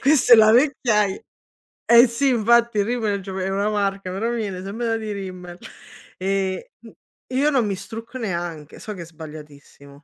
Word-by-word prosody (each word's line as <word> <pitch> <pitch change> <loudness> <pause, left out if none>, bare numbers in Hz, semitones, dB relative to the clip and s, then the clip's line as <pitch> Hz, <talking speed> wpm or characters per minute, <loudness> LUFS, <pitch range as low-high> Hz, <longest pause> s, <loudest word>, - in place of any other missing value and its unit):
questa 275 -3 +4
è - - +11
la 215 -1 +6
vecchiai 230 -6 +2 0.6
Eh, 235 +2 +7
sì, 240 +4 0
infatti, 235 -1 +3
il 200 - +3
rimmel 220 -4 -1
è - - -9
gio 190 0 -7
è 190 0 -2
una 200 +2 0
marca, 195 -2 -2
però 205 +6 -2
viene 205 -6 -4
sempre 210 +5 -4
da 225 0 0
di 220 -1 -5
rimmel. 185 -3 -8 0.6
Ehm, 190 0 -1 0.2
m 230 - -14 0.4
io 285 +3 +3
non 260 -6 +1
mi 200 - -1
strucco 230 +5 -9
neanche, 170 - -5
so 210 - -7
che 180 - -8
è - - -7
sbagliatissimo. 150 -3 -13
205 Hz, 185 wpm, -22 LUFS, 185-235 Hz, 0.6 s, è